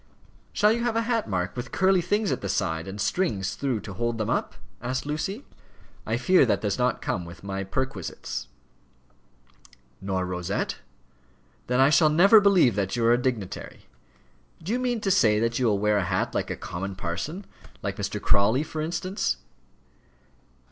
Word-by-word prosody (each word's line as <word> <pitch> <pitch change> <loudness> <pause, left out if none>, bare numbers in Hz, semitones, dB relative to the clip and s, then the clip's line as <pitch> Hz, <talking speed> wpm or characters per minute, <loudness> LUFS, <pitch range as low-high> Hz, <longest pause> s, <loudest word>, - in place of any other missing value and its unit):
"Shall 210 +1 +3
you 235 +1 0
have 240 -2 0
a 230 - +2
hat, 230 -1 -1
Mark, 90 0 -2
with 120 - -5
curly 190 -1 +3
things 205 +4 0
at - - -2
the - - -4
side, 80 -3 -1
and 100 +2 -7
strings 100 - 0
through 130 -6 -2
to 100 - -8
hold 120 +3 -2
them 110 -2 -1
up?" - - -1 0.3
asked 130 +3 -2
Lucy. 190 - -3 0.6
"I - - 0
fear 185 -4 +5
that 120 - +1
does 105 +2 -1
not 125 0 0
come 90 - -1
within 85 +3 -11
my 95 0 -3
perquisites." 95 - -4 1.5
"Nor 95 -1 -1
a - - -2
rosette? 90 -1 -2 0.9
Then 125 +1 +1
I 135 +2 +6
shall 155 0 +5
never 195 +8 +7
believe 190 - +5
that 95 -1 -1
you 115 -1 0
are 115 - +6
a - - +4
dignitary. 120 -8 -4 0.8
Do 185 - -3
you 245 - +1
mean 245 -3 -1
to 195 - +1
say 110 - +4
that 115 +2 0
you 125 - +2
will 105 -2 +2
wear 105 +1 +2
a 100 - 0
hat 90 +1 -1
like - - -1
a - - -3
common 95 +2 -5
parson 145 - -4 0.4
like - - -3
Mr. - - -3
Crawley, 110 +8 +3
for 155 0 -5
instance?" 185 - -1
120 Hz, 180 wpm, -26 LUFS, -, 1.5 s, never